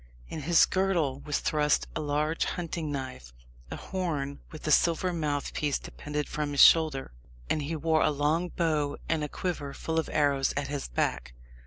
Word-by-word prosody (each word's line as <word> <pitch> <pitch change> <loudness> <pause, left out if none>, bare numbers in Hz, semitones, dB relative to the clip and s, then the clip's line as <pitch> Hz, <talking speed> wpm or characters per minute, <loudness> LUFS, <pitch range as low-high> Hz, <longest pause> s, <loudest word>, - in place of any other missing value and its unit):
In 155 - -5
his 165 +3 +5
girdle 175 -8 0
was 145 0 -2
thrust 150 -1 +2
a 155 - -1
large 150 +2 0
hunting 165 -3 -3
knife; 130 - -6 0.4
a - - -5
horn 150 -7 -3
with 155 - -10
a 155 - +1
silver 175 +3 +3
mouthpiece 145 -2 -1
depended 150 -1 -5
from 150 -1 -3
his 140 - +7
shoulder, 155 - +5 0.4
and 155 - +1
he 150 +3 -3
wore 160 +1 +2
a - - +4
long 150 +4 0
bow 155 -5 0
and 160 -2 0
a 150 - -3
quiver 145 -6 -4
full 160 0 -1
of 160 - -3
arrows 140 -3 +2
at 140 -1 -2
his 145 -1 -3
back. - - -2
150 Hz, 175 wpm, -28 LUFS, 145-165 Hz, 0.4 s, his